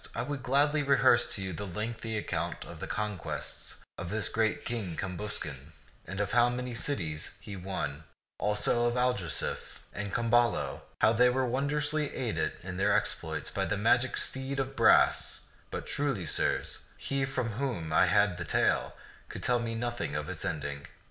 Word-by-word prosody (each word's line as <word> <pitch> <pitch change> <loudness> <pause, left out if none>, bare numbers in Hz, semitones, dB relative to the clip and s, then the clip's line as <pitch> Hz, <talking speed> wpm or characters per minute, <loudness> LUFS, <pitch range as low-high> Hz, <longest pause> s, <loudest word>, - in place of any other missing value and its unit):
I - - -1
would 140 +1 -4
gladly 145 +4 +3
rehearse 130 -4 +4
to 95 - -2
you 95 -1 -3
a - - -3
lengthy 110 +3 -3
account 85 -4 -3
of 85 - -10
the - - -5
conquests 105 -4 -4 0.2
of 90 0 -4
this 105 -2 +1
great 115 +8 0
King 105 -9 -3
Cambuscan, 85 -7 -4 0.3
of 100 +2 -2
how 120 0 +5
many 125 0 -3
cities 85 - -2
he 100 - -8
won; 80 -6 -4 0.4
also 105 +3 +2
of 120 - 0
Algarsife 125 -9 -1 0.2
and 100 0 -4
Camballo, 115 - +2 0.2
how 110 - +6
they 125 +2 +5
were 130 +1 +1
wondrously 150 +4 0
aided 120 -4 -1
in 95 0 -5
their 100 +1 +4
exploits - - -1
by - - -1
the 100 - -1
magic 120 +5 +3
steed 135 +1 -2
of 135 0 -2
brass; - - +4 0.3
but, - - -5
truly, 135 -11 -1
sirs, 75 - +2 0.2
he 140 0 -1
from 135 -3 -1
whom 105 - -3
I 90 - +5
had 95 0 +3
the 85 - -3
tale - - +1 0.3
could - - -7
tell 125 -1 +3
me 115 -1 -2
nothing 120 +1 -2
of - - -2
its - - -4
ending. 70 0 -3
115 Hz, 170 wpm, -30 LUFS, 95-125 Hz, 0.4 s, how